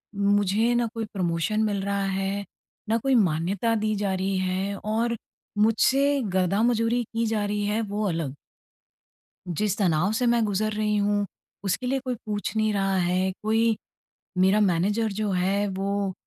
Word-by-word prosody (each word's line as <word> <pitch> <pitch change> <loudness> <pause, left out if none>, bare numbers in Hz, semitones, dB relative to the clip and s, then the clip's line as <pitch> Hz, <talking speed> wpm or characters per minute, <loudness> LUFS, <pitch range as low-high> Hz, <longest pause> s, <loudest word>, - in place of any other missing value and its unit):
मुझे 205 +3 +2
ना 240 0 +2
कोई 225 -1 -3
प्रमोशन 180 +3 0
मिल 205 -2 0
रहा 200 0 -1
है, 195 +1 -2 0.4
ना 225 - +3
कोई 265 +3 +1
मान्यता 190 +3 +1
दी 215 0 0
जा 200 -1 -1
रही 190 +1 -1
है। 190 +2 -1
और 225 +3 -1 0.4
मुझसे 265 +6 +3
गधा-मजूरी 230 +6 +2
की 230 +1 -2
जा 215 -2 0
रही 205 0 -1
है 210 +2 0
वो 210 0 -3
अलग। 165 -6 -2 1.1
जिस 195 +4 0
तनाव 180 0 +2
से 245 +3 +1
मैं 235 -1 +3
गुज़र 215 +1 0
रही 210 0 0
हूँ 205 0 +1 0.4
उसके 200 +6 -1
लिए 270 +2 +1
कोई 255 -1 -1
पूछ 210 0 -3
नहीं 215 0 +2
रहा 195 -1 +1
है। 185 +1 +1
कोई 220 +1 +2 0.6
मेरा 190 +3 +4
मैनेजर 205 +4 +1
जो 210 +1 -2
है 190 +3 +1
वो 200 0 -1
205 Hz, 160 wpm, -25 LUFS, 195-220 Hz, 1.1 s, मेरा